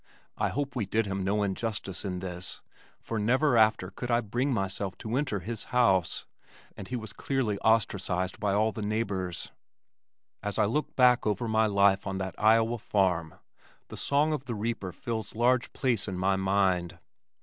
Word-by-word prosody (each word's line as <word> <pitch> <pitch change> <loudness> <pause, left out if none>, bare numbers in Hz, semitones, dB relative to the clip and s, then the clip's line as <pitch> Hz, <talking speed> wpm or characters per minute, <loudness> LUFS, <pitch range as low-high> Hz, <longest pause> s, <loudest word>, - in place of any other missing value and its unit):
I - - 0
hope 140 0 -3
we 110 -6 -1
did 110 +2 +1
him 95 -1 -2
no 105 +2 +1
injustice 100 -2 -3
in 90 -3 -3
this 90 -2 -5 0.4
for 115 - -3
never 125 +6 +3
after 110 -4 +3
could 125 - -6
I 120 0 +3
bring 120 +5 -1
myself 95 -3 -2
to 110 +2 -4
enter 130 -8 -1
his 110 +4 -4
house, 100 -9 +2 0.5
and 95 - -8
he 125 - -4
was 110 -4 -5
clearly 115 -3 -1
ostracized 95 -4 +1
by 105 -2 0
all 105 +2 +2
the 110 - -6
neighbors. 100 -5 -2 0.9
As 105 -1 -3
I - - +4
look 135 +9 -1
back 125 -3 +5
over 105 +3 0
my 110 0 +3
life 100 -1 +3
on 95 -1 -2
that 95 0 -3
Iowa 115 +2 +4
farm 90 -6 0 0.5
the - - -8
song 150 +2 +2
of 140 -3 -4
the 120 -3 -3
reaper 105 -3 -3
fills 110 +2 -5
large 125 +2 +2
place 120 -7 0
in 95 -2 -3
my 95 +1 +2
mind. 95 -2 +1
105 Hz, 175 wpm, -29 LUFS, 95-120 Hz, 0.9 s, back